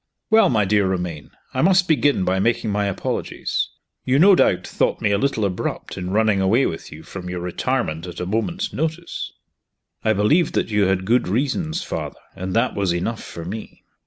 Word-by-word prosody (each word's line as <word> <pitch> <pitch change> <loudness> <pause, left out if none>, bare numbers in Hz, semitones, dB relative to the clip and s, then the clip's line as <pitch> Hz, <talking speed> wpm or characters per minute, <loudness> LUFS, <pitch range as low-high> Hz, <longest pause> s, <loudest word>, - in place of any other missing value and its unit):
Well, 225 0 +6
my 110 -4 +2
dear 100 0 +2
Romayne, 90 -5 -3 0.2
I - - 0
must 180 0 +4
begin 145 - +2
by 95 +1 +1
making 115 +1 +1
my 100 0 0
apologies. 100 - -2 0.3
You 130 +1 +2
no 195 +6 +7
doubt - - +3
thought - - 0
me 100 - +1
a 100 - +3
little 125 -5 +1
abrupt 90 -2 -3
in 90 -1 -4
running 105 0 +2
away 110 +8 +3
with 80 - -4
you 80 +1 -10
from 90 -2 -7
your 90 0 -3
retirement 90 -2 -2
at 85 -1 -8
a 90 - -2
moment's 140 - -2
notice?" 160 +2 -3 0.7
"I 110 - +3
believed 145 - +2
that - - +1
you 105 -1 +3
had 95 0 +1
good 120 +2 +2
reasons, 150 - -1
Father 75 -3 -5 0.2
and 95 0 -4
that - - +2
was 95 -3 0
enough 100 +6 -2
for 85 - -8
me." 105 +5 -7
105 Hz, 190 wpm, -22 LUFS, 90-135 Hz, 0.7 s, no